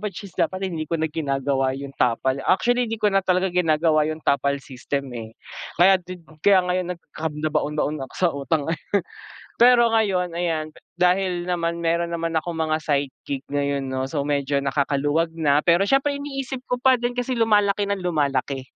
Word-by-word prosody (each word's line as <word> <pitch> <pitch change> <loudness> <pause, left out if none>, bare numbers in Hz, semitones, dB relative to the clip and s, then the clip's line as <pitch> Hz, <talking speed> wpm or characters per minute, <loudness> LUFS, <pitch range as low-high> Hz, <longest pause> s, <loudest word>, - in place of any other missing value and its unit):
which 205 -1 -5
is 195 - -11
dapat 185 +2 -1
hindi 155 -2 -4
ko 165 - 0
na 160 - -1
ginagawa 135 -4 -1
yung 140 0 -7
tapal. 130 +3 +1
Actually, 245 +5 +2
'di 225 - -2
ko 210 -2 +1
na 195 - +4
talaga 185 0 +1
ginagawa 155 -3 +2
yung 155 0 -6
tapal 140 0 +2
system, 135 0 -4
eh. 115 -1 -8 0.4
Kaya 190 +1 +5
din 180 -1 -10 0.2
kaya 190 0 +5
ngayon 180 0 -1
nag - - -32
nagkanda-baon-baon 150 -1 -2
ako - - -19
sa 180 - +3
utang, 140 +2 -1
eh. 165 - -3 0.8
Pero 240 -1 +6
ngayon, 190 -6 +1
ayan, 160 -3 -2 0.2
dahil 180 0 +1
naman 170 -1 -2
meron 170 +1 0
naman 165 0 -2
akong 170 +1 -6
mga 155 -1 0
side 145 -3 -1 0.2
gig 140 -1 -3
ngayon 140 -1 -1
'no, 130 0 -3
so 140 0 -2
medyo 140 -1 0
nakakaluwag 145 +3 +1
na. 145 -3 +3
Pero 170 +4 +3
siyempre 275 +7 +2
iniisip 270 -2 -5
ko 250 - -1
pa 260 0 +5
din 240 0 -2
kasi 250 +1 -1
lumalaki 210 -3 +3
ng 200 0 -1
lumalaki. 145 -6 -1
165 Hz, 180 wpm, -23 LUFS, 145-190 Hz, 0.8 s, Pero